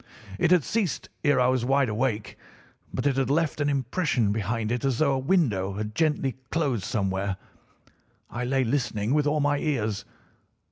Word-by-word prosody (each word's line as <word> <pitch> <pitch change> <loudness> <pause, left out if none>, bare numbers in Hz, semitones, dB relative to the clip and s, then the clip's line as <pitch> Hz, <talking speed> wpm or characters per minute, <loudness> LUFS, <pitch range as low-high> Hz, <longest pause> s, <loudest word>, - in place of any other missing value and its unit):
It 175 - +3
had 180 -4 +5
ceased 210 - -1
ere 145 -3 +4
I 125 - +4
was 130 -1 +2
wide 135 +1 +3
awake, 110 -1 -1 0.6
but - - -3
it 140 -2 +2
had 135 -2 +1
left 155 +1 +1
an 145 - +2
impression 135 - 0
behind 110 +1 -1
it 120 -1 -1
as 135 -3 +1
though 140 -1 +3
a 135 - 0
window 130 - +1
had 105 +2 -4
gently 150 -4 0
closed 135 - 0
somewhere. 95 -3 -1 0.9
I 120 - -4
lay 135 +1 +1
listening 115 -3 0
with 150 -1 +2
all 150 +1 +1
my 145 0 +2
ears. 110 -10 -1
130 Hz, 175 wpm, -26 LUFS, 110-145 Hz, 0.9 s, had